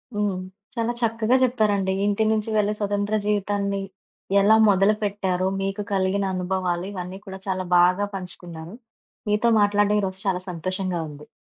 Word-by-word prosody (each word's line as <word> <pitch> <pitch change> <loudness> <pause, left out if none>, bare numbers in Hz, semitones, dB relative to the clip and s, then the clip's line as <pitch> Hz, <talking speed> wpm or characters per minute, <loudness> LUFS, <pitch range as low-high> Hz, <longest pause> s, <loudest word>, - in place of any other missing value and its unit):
హ్మ్. 205 -2 0 0.4
చాలా 230 0 0
చక్కగా 230 +1 +1
జెప్పారండి. 210 -6 +2
ఇంటి 205 +1 +1
నుంచి 220 0 0
వెళ్ళే 210 0 +2
స్వతంత్ర 205 0 0
జీవితాన్ని 200 -1 0 0.6
ఎలా 210 +2 +6
మొదలుపెట్టారు? 195 -2 +1
మీకు 195 +1 -2
కలిగిన 195 +1 +1
అనుభవాలు 180 -1 -1
ఇవన్నీ 185 0 -6
కూడా 190 -1 -8
చాలా 185 -1 -1
బాగా 180 +3 +4
పంచుకున్నారు. 175 -1 -8 0.5
మీతో 210 +3 +3
మాట్లాడడం 205 0 +3
ఈరోజు 190 -1 -3
చాలా 185 -1 0
సంతోషంగా 185 +1 -3
ఉంది. 150 0 -12
200 Hz, 130 wpm, -24 LUFS, 185-210 Hz, 0.6 s, ఎలా